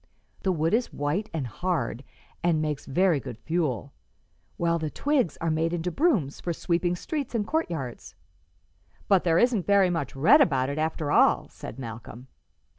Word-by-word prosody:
The 190 Hz, -, +1 dB
wood 165 Hz, +1 st, 0 dB
is 235 Hz, +2 st, +1 dB
white 150 Hz, +10 st, -2 dB
and 155 Hz, -5 st, -3 dB
hard 130 Hz, -2 st, -2 dB, 0.4 s
and 170 Hz, -2 st, +2 dB
makes 150 Hz, -2 st, -3 dB
very 175 Hz, +2 st, +2 dB
good 125 Hz, -4 st, -8 dB
fuel, 135 Hz, -, -2 dB, 0.6 s
while 170 Hz, 0 st, +1 dB
the 155 Hz, -1 st, -2 dB
twigs 270 Hz, -, 0 dB
are 165 Hz, -1 st, 0 dB
made 165 Hz, +2 st, 0 dB
into 175 Hz, +1 st, -2 dB
brooms 200 Hz, -, +1 dB
for 175 Hz, -, -2 dB
sweeping 175 Hz, +1 st, 0 dB
streets 280 Hz, -, -4 dB
and 210 Hz, -3 st, 0 dB
courtyards." 135 Hz, -, -3 dB, 0.9 s
"But 195 Hz, -3 st, +3 dB
there 165 Hz, -1 st, +3 dB
isn't 235 Hz, -3 st, +2 dB
very 200 Hz, -3 st, +4 dB
much 165 Hz, -7 st, -3 dB
red 165 Hz, -, +6 dB
about 135 Hz, -, +2 dB
it, 145 Hz, -, -3 dB
after 155 Hz, -1 st, -1 dB
all," -, -, +4 dB
said 110 Hz, -, -9 dB
Malcolm. 120 Hz, +1 st, -9 dB
165 Hz, 165 wpm, -26 LUFS, 140-185 Hz, 0.9 s, red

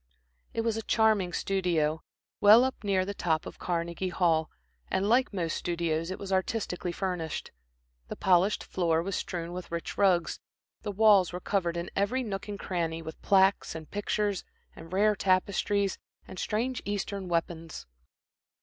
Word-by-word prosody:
It 230 Hz, -, +1 dB
was 225 Hz, -1 st, 0 dB
a -, -, -2 dB
charming 215 Hz, -5 st, +2 dB
studio, 170 Hz, -5 st, 0 dB, 0.4 s
well 215 Hz, +4 st, +8 dB
up 260 Hz, -2 st, -2 dB
near 195 Hz, -2 st, +1 dB
the 200 Hz, -, -4 dB
top 160 Hz, -5 st, 0 dB
of -, -, -9 dB
Carnegie 170 Hz, +1 st, -2 dB
Hall, 165 Hz, -3 st, +2 dB, 0.4 s
and 195 Hz, -, 0 dB
like 245 Hz, +4 st, +3 dB
most 170 Hz, -5 st, -2 dB
studios, 165 Hz, -1 st, -1 dB
it 185 Hz, -, -4 dB
was 195 Hz, -1 st, -4 dB
artistically 190 Hz, -2 st, -1 dB
furnished. 175 Hz, -4 st, -3 dB, 0.6 s
The -, -, -5 dB
polished 185 Hz, +2 st, +3 dB
floor 165 Hz, -3 st, 0 dB
was 195 Hz, +1 st, -3 dB
strewn 170 Hz, -1 st, -4 dB
with 180 Hz, -1 st, -7 dB
rich 170 Hz, 0 st, -4 dB
rugs, 180 Hz, -5 st, +3 dB, 0.4 s
the 205 Hz, -, -3 dB
walls 205 Hz, -2 st, +5 dB
were 180 Hz, -, -4 dB
covered 175 Hz, -3 st, -1 dB
in 170 Hz, -, -4 dB
every 215 Hz, +7 st, +1 dB
nook 195 Hz, -3 st, -4 dB
and 205 Hz, -1 st, -5 dB
cranny, 165 Hz, -4 st, -2 dB
with 160 Hz, 0 st, -9 dB
plaques, 195 Hz, -2 st, +3 dB
and 160 Hz, -1 st, -8 dB
pictures, 205 Hz, -1 st, -1 dB, 0.3 s
and 165 Hz, -, -11 dB
rare 210 Hz, +3 st, +3 dB
tapestries, 195 Hz, +1 st, +1 dB, 0.3 s
and 185 Hz, -, -8 dB
strange 235 Hz, +4 st, -1 dB
Eastern 200 Hz, -1 st, -3 dB
weapons. 165 Hz, -1 st, -3 dB
185 Hz, 160 wpm, -29 LUFS, 170-205 Hz, 0.6 s, well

